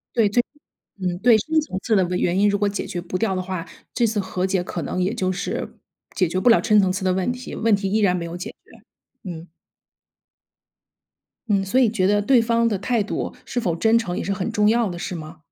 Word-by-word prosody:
对， 225 -3 +4
最 240 +4 +2 0.6
嗯， 180 -1 -1
对， 230 +1 +6
深 315 +9 +1
层 190 -11 -5
次 225 - +2
的 190 - +4
原 180 0 +1
因， 205 +1 +4
如 205 0 0
果 205 - +2
解 200 0 -3
决 175 - -4
不 180 +1 -4
掉 195 -2 0
的 185 - -1
话， 185 -2 -4 0.3
这 240 - +2
次 220 -1 0
和 185 -1 -2
解 190 -1 0
可 180 - -5
能 180 - -2
也 190 +4 0
就 185 -6 -1
是， 185 +1 -4 0.4
解 185 - +2
决 180 +3 -1
不 240 - +4
了 230 - +6
深 210 -1 +4
层 190 -2 +3
次 190 +1 -3
的 185 - +3
问 190 +5 0
题， 250 0 -7
问 225 -2 +3
题 195 -1 -3
依 215 - +2
然 195 -4 +3
没 170 -2 -3
有 170 +1 -6
解 180 - -6
决。 - - -26 0.6
嗯。 170 0 -8 2.0
嗯， 200 -2 +2
所 200 +7 +2
以 245 -4 +4
觉 205 -4 0
得 205 +1 +3
对 245 +3 +4
方 230 0 +2
的 210 -3 0
态 230 +4 0
度 205 - -3
是 245 - -2
否 175 -8 -1
真 220 +6 +3
诚 185 -6 -2
也 - - -2
是 200 - -1
很 190 +3 -3
重 210 -2 +2
要 230 -1 +2
的 175 -1 -6
是 180 - -4
吗？ 155 0 -8
200 Hz, 265 characters per minute, -22 LUFS, 185-225 Hz, 2.0 s, 对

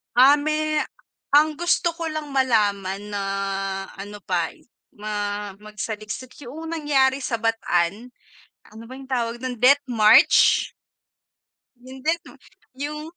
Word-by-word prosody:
Ah, 270 +4 +7
me 310 +1 0 0.6
ang 305 +1 +4
gusto 345 0 +2
ko 335 0 -5
lang 310 -2 -5
malaman 205 -6 0
na, 200 -1 -2 0.8
ano 205 0 -9
pa, 175 -3 0
eh, - - -23 0.3
ma 205 -1 -4
magsaliksik, 215 +3 -7
yoong 320 +6 -7
nangyari 280 -4 +2
sa 255 -3 -2
Bataan. 225 -2 0 0.7
Ano 225 +1 -11
ba 260 - -9
yung 270 - -10
tawag 240 -3 -2
do'n, 255 +1 -4
death 280 +3 +5
march? 225 -4 +5 1.0
Hindi 260 +5 -3
'no - - -14 0.4
yung 295 +3 -5
250 Hz, 125 wpm, -23 LUFS, 210-290 Hz, 1.0 s, Ah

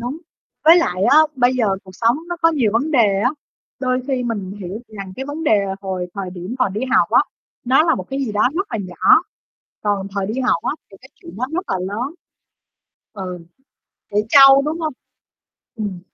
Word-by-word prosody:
đúng, 245 +6 -4 0.5
với 330 +2 +8
lại 185 - 0
á 285 - +5 0.2
bây 245 0 +3
giờ 250 -3 +1 0.2
cuộc 190 - -12
sống 230 +5 +2
nó 350 - -3
có 330 - +6
nhiều 255 -9 +1
vấn 275 +8 0
đề 210 -9 +3
á, 250 - +3 0.5
đôi 255 -1 0
khi 265 -3 -1
mình 205 -6 -4
hiểu 195 +4 -6
rằng, 195 -3 -8
cái, 265 - -4
vấn 295 +3 -5
đề 215 -9 +4 0.2
hồi 185 -2 -4
thời 195 -2 -5
điểm 180 +5 -7
còn 250 -7 +1
đi 210 - -3
học 265 - +3
á, - - +6 0.4
nó 260 +4 +4
là 325 0 +3
một 185 - -6
cái 270 - -3
gì 220 - -4
đó 210 +4 +3
rất 385 +4 -1
là 225 - -2
nhỏ, 185 - +3 0.6
còn 200 -2 -1
thời 195 -1 -1
đi 225 +5 -3
học 245 -9 +1
á - - 0 0.2
thì 195 - -14
cái 265 - -16
chuyện 170 - -13
đó 250 - -1
rất 360 +3 -1
là 190 - 0
lớn. 210 - -4 1.0
Ừ, 185 -3 -6 0.7
trẻ 205 - -4
trâu, 275 +1 +8
đúng 310 +3 -3
hông? 315 -1 -2 0.8
Ừm. 205 -5 -4
230 Hz, 210 wpm, -19 LUFS, 195-270 Hz, 1.0 s, với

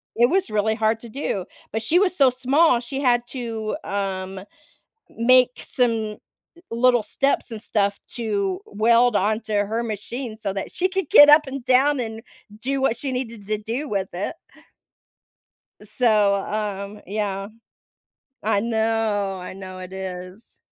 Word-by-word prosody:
it 240 +1 +4
was 370 - +1
really 215 +1 +1
hard 220 0 +1
to 235 - -10
do, 215 -7 -3 0.3
but 220 - -2
she 310 +10 +2
was 370 -2 +2
so 275 -6 +5
small, 260 +2 +3
she 270 +3 -5
had 240 -3 +3
to, 225 -3 -4
um, 195 -1 -3
m 185 - -11 0.7
make 250 +2 +4
some 225 -4 -1 0.5
little 240 0 +3
steps 275 +5 0
and 225 -2 -6
stuff 200 -3 0
to 200 -6 -2
weld 230 +2 +3
onto 215 +3 0
her 205 +3 0
machine 230 +1 -5
so 205 -3 -3
that 195 0 -5
she 370 - 0
could 380 -4 -3
get 290 - +9
up 300 0 +7
and 265 -2 -6
down 270 +3 +4
and 225 -1 -5 0.4
do 270 +2 -1
what 265 -3 +1
she 275 +3 -4
needed 235 -5 -5
to 215 0 0
do 235 +8 -4
with 195 -2 -1
it. 195 - -4 1.5
So, 215 -5 +2
um, 205 0 -4
yeah. 200 0 -3 1.0
I 210 -1 +2
know, 220 -3 0
I 180 - -7
know 185 -1 -9
it 185 0 -9
is. 185 +2 -8
220 Hz, 155 wpm, -23 LUFS, 200-250 Hz, 1.5 s, get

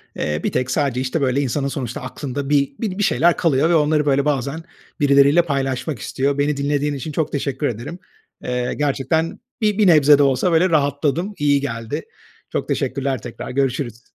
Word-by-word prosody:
Eee, 75 0 -2
bir - - 0
tek, 125 0 -1
sadece, 135 -4 0
işte, 130 +4 -2
böyle, 135 +1 +1
insanın 140 +1 -1
sonuçta 135 0 -4
aklında 135 +1 -5
bi 140 -2 +1
bi 205 -4 -3
bir 205 - 0
şeyler 175 -4 +3
kalıyor 155 -2 +2
ve 170 - +3
onları, 150 -1 +2
böyle, 140 0 +2
bazen 140 +2 -1 0.4
birileriyle 140 +3 +5
paylaşmak 135 -3 -2
istiyor. 140 +1 -1
Beni 145 0 0
dinlediğin 145 +1 0
için 145 +3 -5
çok 155 +1 -1
teşekkür 140 0 -2
ederim. 120 - -6 0.4
Eee, 125 0 -2
gerçekten 150 +3 -1 0.2
bi 210 -2 +1
bir 210 -3 +4
nebze 150 -3 +6
de 145 - +4
olsa, 135 +6 +2
böyle, 165 +3 +3
rahatladım, 150 +5 0
iyi 145 -1 +2
geldi. 115 -5 -4 0.5
Çok - - -3
teşekkürler 135 -2 -2
tekrar, - - -8
görüşürüz. 125 -3 -2
140 Hz, 180 wpm, -20 LUFS, 130-155 Hz, 0.5 s, nebze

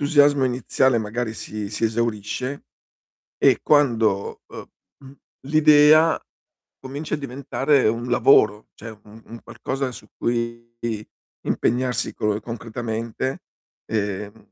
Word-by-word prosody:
l'entusiasmo 145 -1 +4
iniziale 125 0 +1
magari 110 +1 -3
si 105 -2 -6
si 110 - -2
esaurisce 115 +4 -2 0.7
e - - +4
quando, 115 -9 +2
uhm, - - -8 0.4
mhmm, 135 - -12 0.3
l'idea 155 +1 +6 0.6
comincia 140 +4 -6
a - - -6
diventare 140 -1 0
un 120 +2 -1
lavoro, 110 -4 +4
cioè 115 - -9
un 110 +2 -15
un 115 0 -11
qualcosa 135 0 -4
su - - -12
cui 115 0 -2 0.7
impegnarsi 125 -1 0
colo 105 0 -1
concretamente, 115 +2 -4 0.4
ehm, 105 0 -4
120 Hz, 110 wpm, -22 LUFS, 110-135 Hz, 0.7 s, l'idea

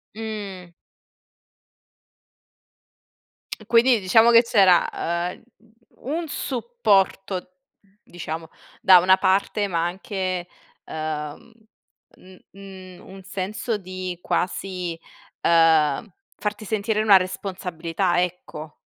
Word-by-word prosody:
Mh. 200 -5 -7 2.9
E - - -15
quindi 235 0 +4
diciamo 225 +5 +5
che 230 0 +8
c'era, 195 -7 +4
uhm, 170 +1 -3 0.7
un 335 -1 -3
supporto 245 - -1 0.4
diciamo, 165 -1 -7 0.3
da 185 -1 +8
una 185 +2 +5
parte 200 +2 +1
ma 170 -2 -1
anche, 185 -1 -3 0.4
uhm, 155 +6 -6 0.6
mhmm, 185 0 -16 0.2
mhmm, 190 -2 -12
un 190 0 -11
senso 205 +4 -3
di 185 -2 -6
quasi, 180 -2 -3 0.4
uhm, 160 -4 +3 0.3
farti 210 +1 -4
sentire 215 +1 -1
una 205 -3 +7
responsabilità, 180 -1 -2
ecco. 160 -3 -7
185 Hz, 90 wpm, -23 LUFS, 175-210 Hz, 2.9 s, che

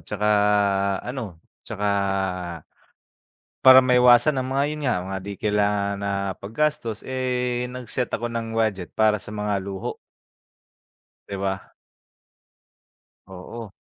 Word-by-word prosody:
'tsaka 105 - -3 0.8
ano 120 -8 -6 0.2
'tsaka 105 +1 -4 1.8
para 130 0 +10
maiwasan 125 +2 +5
ang 130 - -2
mga- 140 +1 +2
'yon 150 0 -5
nga- 125 - +2
mga 95 0 -3
di 100 - -4
kailangan 105 -1 +1
na 100 0 -2 0.3
paggastos, 115 0 -2
eh, 125 -1 -2
nag-set 125 0 -3
ako 120 +1 -3
ng 115 -1 -4
budget 105 -6 -1
para 110 -1 +3
sa 105 +1 -6
mga 105 -1 -1
luho. 95 0 -5 1.3
'Di 100 - -4
ba? 95 -1 -3 1.5
Oo. 95 +4 -9
115 Hz, 115 wpm, -24 LUFS, 100-125 Hz, 1.8 s, para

